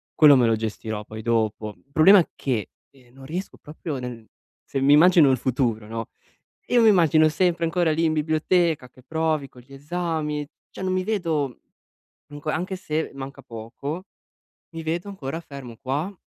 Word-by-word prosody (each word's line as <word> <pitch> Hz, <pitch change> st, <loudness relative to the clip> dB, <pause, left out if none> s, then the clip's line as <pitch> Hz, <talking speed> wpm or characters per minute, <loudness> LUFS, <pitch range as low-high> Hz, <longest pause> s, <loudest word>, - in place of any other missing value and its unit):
quello 150 Hz, -2 st, +8 dB
me 125 Hz, -3 st, +4 dB
lo 115 Hz, -, +3 dB
gestirò 110 Hz, -1 st, -4 dB
poi 110 Hz, +1 st, -8 dB
dopo. 110 Hz, -2 st, -1 dB
Il 140 Hz, -, -32 dB
problema 175 Hz, +4 st, +6 dB
che, 120 Hz, -7 st, -2 dB, 0.2 s
ehm, 125 Hz, -3 st, -23 dB
non 135 Hz, 0 st, -13 dB
riesco 175 Hz, +7 st, -5 dB
proprio 150 Hz, -1 st, -6 dB
nel 120 Hz, -3 st, -7 dB, 0.4 s
se 135 Hz, -, -2 dB
mi 140 Hz, +2 st, +5 dB
immagino 165 Hz, -1 st, +7 dB
il 130 Hz, -, +2 dB
futuro, 120 Hz, -4 st, -1 dB
no, 115 Hz, 0 st, -5 dB, 0.6 s
io 245 Hz, -, +4 dB
mi 225 Hz, -, +7 dB
immagino 160 Hz, -5 st, +5 dB
sempre 170 Hz, +1 st, +1 dB
ancora 165 Hz, -1 st, +1 dB
lì 160 Hz, +2 st, +1 dB
in 160 Hz, -1 st, +2 dB
biblioteca, 155 Hz, -1 st, +1 dB
che 130 Hz, -, -20 dB
provi 155 Hz, 0 st, -1 dB
con 125 Hz, -, -15 dB
gli 135 Hz, +3 st, -16 dB
esami, 150 Hz, 0 st, -3 dB, 0.2 s
cioè -, -, -11 dB
non 185 Hz, 0 st, -1 dB
mi 185 Hz, 0 st, 0 dB
vedo 165 Hz, -, -1 dB, 0.7 s
comunque 145 Hz, +1 st, -5 dB
anche 185 Hz, +3 st, -2 dB
se 160 Hz, -4 st, -3 dB
manca 140 Hz, 0 st, -8 dB
poco, 130 Hz, +8 st, -7 dB, 0.7 s
mi 165 Hz, -, -5 dB
vedo 170 Hz, +5 st, -3 dB
ancora 160 Hz, -5 st, -5 dB
fermo 140 Hz, -7 st, -10 dB
qua, 145 Hz, +9 st, -2 dB
150 Hz, 175 wpm, -24 LUFS, 125-165 Hz, 0.7 s, quello